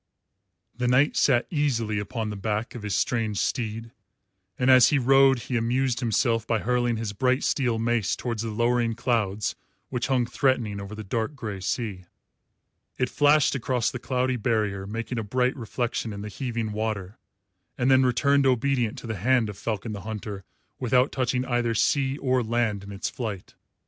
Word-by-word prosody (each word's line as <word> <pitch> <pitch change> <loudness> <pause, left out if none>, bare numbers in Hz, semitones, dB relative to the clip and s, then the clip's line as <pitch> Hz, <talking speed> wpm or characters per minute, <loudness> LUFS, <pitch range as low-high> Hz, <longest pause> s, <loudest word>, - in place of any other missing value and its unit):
The 125 +1 -1
knight 130 +4 +3
sat 125 -3 +3
easily 120 -9 0
upon 110 0 -4
the - - -5
back 105 +3 -2
of 120 - -7
his 105 -1 -2
strange 110 -4 0
steed, 115 +1 -2 0.7
and 130 +1 +3
as 130 -3 +8
he 145 - +3
rode 135 0 +5
he 125 - -4
amused 120 +2 +1
himself 115 -1 +1
by 115 - +2
hurling 120 +1 0
his 110 -2 -3
bright 130 +4 +1
steel 125 -5 +1
mace 115 -2 0
towards 115 -3 -3
the 115 - -3
lowering 120 +1 +1
clouds 105 -4 0 0.4
which 125 -2 -2
hung 130 -3 +2
threatening 120 -5 0
over 100 +2 -7
the 110 - -7
dark 110 +7 -2
grey 105 -7 -5
sea. 95 -2 -3 0.9
It 125 - 0
flashed 145 0 +4
across 125 -3 0
the 125 - -5
cloudy 125 0 0
barrier, 105 -4 -1
making 115 +3 -4
a - - -2
bright 125 +4 0
reflection 120 -2 -3
in 100 0 -6
the 105 - -5
heaving 115 -2 -3
water, 105 -2 -3 0.6
and 125 +2 +2
then 130 0 +6
returned 140 +2 +3
obedient 125 -2 +1
to - - -9
the 110 -2 -4
hand 120 +3 +2
of - - -12
Falcon 110 0 -3
the 100 -2 -6
Hunter 105 -2 -6 0.4
without 125 +1 +2
touching 125 0 0
either 120 -2 0
sea 135 +4 +1
or 130 -3 +1
land 115 -3 -1
in 100 - -9
its 100 - -3
flight. 105 -7 -5
120 Hz, 175 wpm, -26 LUFS, 110-130 Hz, 0.9 s, as